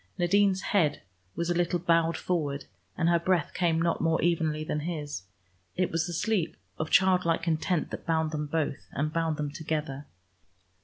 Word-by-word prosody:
Nadine's 190 +1 +3
head 160 -8 +2 0.4
was 170 +1 -1
a - - +3
little 175 0 +1
bowed 165 -1 +2
forward, 145 -6 -2 0.3
and 170 - +2
her 170 0 +4
breath 170 -2 +1
came 165 -3 +1
not 170 0 +1
more 165 0 +2
evenly 160 -3 +1
than 150 -1 -2
his. 150 - -4 0.5
It 185 0 0
was 165 +1 0
the 175 - -4
sleep 180 -2 0 0.2
of 155 - -2
childlike 180 -3 +3
content 165 +1 0
that - - -7
bound 160 -1 +1
them 150 -1 -2
both, 150 -2 -2
and 150 +2 -1
bound 165 -2 0
them 150 -2 -2
together. 150 -3 -3
165 Hz, 170 wpm, -28 LUFS, 155-175 Hz, 0.5 s, her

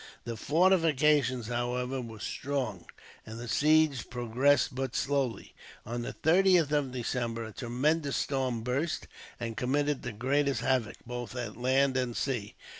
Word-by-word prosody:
The 120 -1 -4
fortifications, 150 - +3
however, 125 +2 -2
were 115 -2 -9
strong, 130 -8 -3 0.4
and 110 0 -9
the 120 - -6
siege 150 0 +3
progressed 125 +4 +2
but 135 +1 -3
slowly. 135 -4 -1 0.3
On 120 +2 -3
the 120 - -5
30th 175 -2 +4
of 145 -3 +1
December 120 -2 -2
a 110 - -8
tremendous 140 +5 0
storm 130 -4 -1
burst, 140 +7 -1 0.3
and 115 -1 -4
committed 145 +3 0
the 125 - -4
greatest 140 +5 0
havoc, 130 -6 0
both 120 0 -6
at 120 -4 -4
land 130 +2 +2
and 125 -2 -1
sea. 120 -7 -2
130 Hz, 140 wpm, -30 LUFS, 120-145 Hz, 0.4 s, 30th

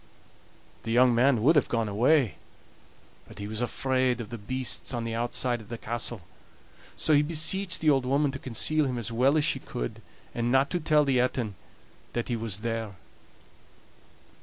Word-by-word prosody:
The 115 - -7
young 125 +1 +5
man 120 -1 +3
would 155 +6 +5
have 150 - +3
gone 115 -2 0
away, 120 +4 +2 0.9
but - - -14
he 100 - -6
was 110 +2 -4
afraid 130 0 0
of 110 -3 -6
the 120 - -6
beasts 130 +3 -1
on 120 - -3
the 115 0 -4
outside 120 +1 -1
of 105 - -15
the 120 - -5
castle; 120 -1 -3 0.7
so 155 - +2
he 145 - +6
beseeched 170 +5 +1
the 155 -2 +4
old 135 -2 +1
woman 140 +2 +2
to 135 - -7
conceal 145 +5 0
him 130 -2 -2
as 115 -1 -3
well 130 +6 +3
as 150 - +2
she - - +1
could, - - -6 0.3
and 120 0 -1
not 135 +2 +3
to 175 - 0
tell 150 -2 +3
the 135 -2 +2
Etin 125 -4 -1 0.6
that 120 +1 -3
he 120 - 0
was 110 -3 -3
there. 115 -3 -3
125 Hz, 185 wpm, -27 LUFS, 115-140 Hz, 0.9 s, he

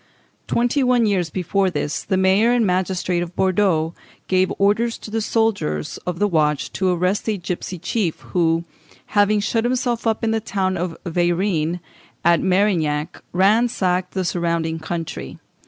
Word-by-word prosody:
Twenty 245 +4 +1
one 250 -2 +3
years 185 -5 +1
before 185 +3 0
this, 150 -2 -2
the 190 - 0
mayor 190 +5 +4
and 240 -2 +3
magistrates 180 -1 0
of 175 0 -6
Bordeaux 185 -4 +1 0.3
gave 185 0 +2
orders 220 +4 +2
to 215 - -10
the 225 0 -1
soldiers 205 - -1
of 180 -1 -2
the 205 +3 +2
watch 150 -5 0
to 190 -1 0
arrest 180 +5 0
a 215 - 0
gipsy 180 0 -5
chief, 175 0 -2
who, 165 -2 +1 0.5
having 205 0 +4
shut 225 +2 0
himself 245 -1 0
up 225 +1 0
in 225 - +1
the 225 - +1
tower 190 -3 -1
of 175 -1 -3
Veyrines, 175 -1 0 0.4
at 170 -1 +4
Merignac, 175 -6 +1
ransacked 190 -2 +2
the 190 -1 0
surrounding 170 -2 -1
country. 165 0 -5
185 Hz, 155 wpm, -21 LUFS, 170-210 Hz, 0.5 s, mayor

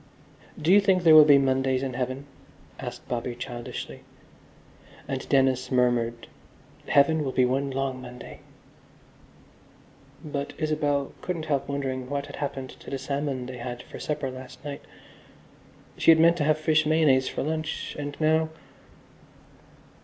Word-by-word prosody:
"Do 165 +5 +3
you 205 - +7
think 190 -3 +2
there 160 -2 +7
will 155 -1 +10
be 145 -2 +7
Mondays 130 -1 +1
in 130 -2 -3
Heaven?" 130 +3 -3 0.5
asked - - -7
Bobby 120 0 -3
childishly. 120 -1 -7 1.1
And - - -4
Dennis 130 -2 +2
murmured, 120 -2 +1 0.6
"Heaven 150 +2 +4
will 135 - -2
be 130 - +3
one 135 +2 0
long 135 -1 -3
Monday." 125 0 -10 1.9
But 145 -1 -4
Isabel 145 -3 0
couldn't 170 -3 -3
help 140 -4 -1
wondering 130 -2 -3
what 140 0 -2
had - - -10
happened 140 -2 -4
to - - -11
the 135 - -3
salmon 140 -1 -3
they 130 0 -7
had 120 0 -6
for - - -11
supper 145 -3 -3
last 130 +1 -11
night. 145 -1 -6 1.2
She - - +3
had 160 -1 +8
meant 170 +1 +5
to 150 - 0
have 155 0 +3
fish 155 0 +2
mayonnaise 150 -4 +3
for - - -3
lunch 155 +1 -3
and 145 0 -5
now.... 160 0 +2
140 Hz, 145 wpm, -26 LUFS, 130-155 Hz, 1.9 s, will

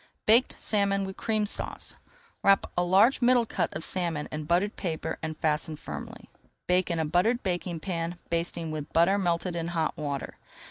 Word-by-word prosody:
BAKED 235 +4 +5
SALMON 200 -2 +1
WITH 190 0 -6
CREAM 215 -2 0
SAUCE 205 - -3 0.5
Wrap 195 0 +5
a 175 - +2
large 200 +10 +4
middle 245 -1 +5
cut - - -1
of 155 - -3
salmon 170 -5 0
in 150 0 -4
buttered 180 +6 +1
paper 165 -5 -3
and 160 -1 -4
fasten 155 0 0
firmly. - - -8 0.4
Bake 180 0 +2
in 170 - 0
a 160 - 0
buttered 200 +10 +2
baking 175 -3 -2
pan, 170 -1 -3
basting 170 -1 -2
with 150 -1 -5
butter 180 +5 +4
melted 175 -1 0
in 165 -1 -2
hot 165 -2 -1
water. 145 -2 -4
175 Hz, 175 wpm, -28 LUFS, 160-195 Hz, 0.5 s, BAKED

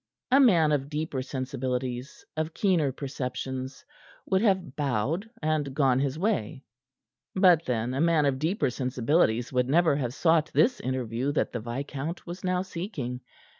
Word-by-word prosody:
A 270 - +6
man 175 - +5
of 140 -1 0
deeper 150 -3 -2
sensibilities, 130 -1 -4
of 155 +1 -3
keener 175 -9 +2
perceptions, 130 -1 -5 0.4
would 190 0 +1
have 190 - +1
bowed 145 - -1
and 150 -3 0
gone 135 -3 +3
his 140 +1 -1
way. 160 - -1 0.7
But 180 -4 +5
then 120 0 -1
a 135 - 0
man 165 -3 +3
of 135 -2 +1
deeper 160 - 0
sensibilities 125 -1 +1
would 125 0 +1
never 165 0 +4
have 125 -3 -3
sought 160 -2 +3
this 250 +1 +4
interview 130 +1 -2
that - - 0
the 120 - -3
viscount 135 +7 -5
was 175 +1 -8
now 185 0 0
seeking. 170 - -5
140 Hz, 150 wpm, -27 LUFS, 130-170 Hz, 0.7 s, A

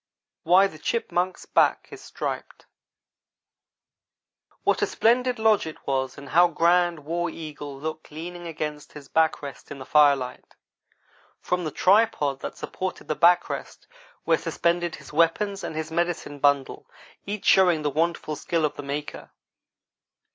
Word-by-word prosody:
WHY 180 +4 +5
THE 155 -5 -6
CHIPMUNK'S 185 -2 -2
BACK - - +2
IS - - -10
STRIPED - - -6 2.0
WHAT - - +2
a - - +2
splendid 250 +2 +2
lodge 220 -5 +3
it 160 - -10
was, 130 -1 -1
and 140 -1 -10
how 175 +1 +6
grand 170 0 +2
War 175 +2 -1
Eagle 150 -4 -8
looked 155 +1 -6
leaning 175 +3 -7
against 150 -2 -5
his 145 -2 -11
back 160 0 +1
rest 140 -1 -9
in 145 - -7
the 130 - -9
firelight! 140 -4 +2 0.8
From 180 -1 -2
the - - -1
tripod 165 -6 +2
that - - -7
supported 185 0 -5
the 155 - 0
back 175 +3 +4
rest - - -7 0.4
were - - +3
suspended 175 0 -1
his - - -14
weapons 195 +4 +1
and - - -5
his 160 0 -4
medicine 170 -3 -2
bundle, 140 -1 +1 0.4
each 205 0 -4
showing 175 -5 +5
the 145 - 0
wonderful 160 0 -1
skill 165 +2 -1
of 150 - -2
the - - -4
maker. 145 +1 -6
160 Hz, 145 wpm, -25 LUFS, 150-175 Hz, 2.0 s, how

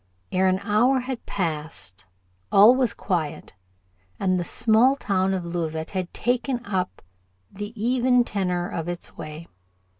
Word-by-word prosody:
Ere 190 +1 +2
an 185 0 +3
hour 245 +6 +3
had 255 -1 -6
passed 150 - -4 0.4
all 210 +5 +8
was 255 -4 +2
quiet, 170 -6 -3 0.7
and 185 -1 +1
the - - -1
small 230 +8 +4
town 195 -7 0
of 185 -2 -2
Leauvite 160 -2 -3
had 185 -3 -3
taken 245 0 -1
up 185 -2 -3 0.5
the 205 +2 -6
even 250 +2 +3
tenor 180 -5 -1
of 165 -1 -4
its 175 0 -5
way. 155 +2 -8
190 Hz, 140 wpm, -24 LUFS, 175-240 Hz, 0.7 s, all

